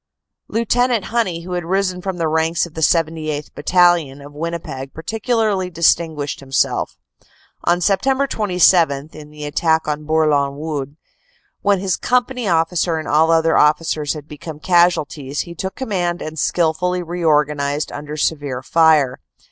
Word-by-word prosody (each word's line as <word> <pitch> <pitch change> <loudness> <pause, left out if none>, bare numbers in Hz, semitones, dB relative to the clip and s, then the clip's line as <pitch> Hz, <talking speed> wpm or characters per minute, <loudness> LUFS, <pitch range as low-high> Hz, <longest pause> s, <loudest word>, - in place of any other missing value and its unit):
Lieut. 230 0 0
Honey, 235 -7 0
who 180 - -8
had 175 -1 -2
risen 185 +1 -1
from 190 -1 -4
the 165 -2 0
ranks 160 +2 +1
of 170 - -13
the 160 - -6
78th. 155 -2 0
Battalion, 170 -3 +2
of 145 +1 -12
Winnipeg, 150 -4 -5
particularly 215 0 -1
distinguished 160 -3 +1
himself. 135 -1 -1 0.7
On 175 - +3
Sept. 260 +10 +1
27, 175 - +2
in 150 -1 -11
the 150 0 -10
attack 160 +2 +1
on 150 0 -3
Bourlon 150 -3 +1
Wood, 145 -2 -5 0.6
when 200 -1 +3
his 190 -2 -1
company 250 -1 0
officer 165 0 +1
and 155 - -5
all 155 +2 +3
other 165 0 +3
officers 150 0 +2
had 150 -2 -9
become 150 0 -9
casualties, 155 -4 +1
he 170 - -8
took 190 +3 -5
command 180 -8 -2
and 155 0 -6
skilfully 180 +3 0
reorganized 150 -4 0
under 150 +1 -7
severe 145 -4 -2
fire. 155 -5 +3
165 Hz, 140 wpm, -19 LUFS, 150-180 Hz, 0.7 s, On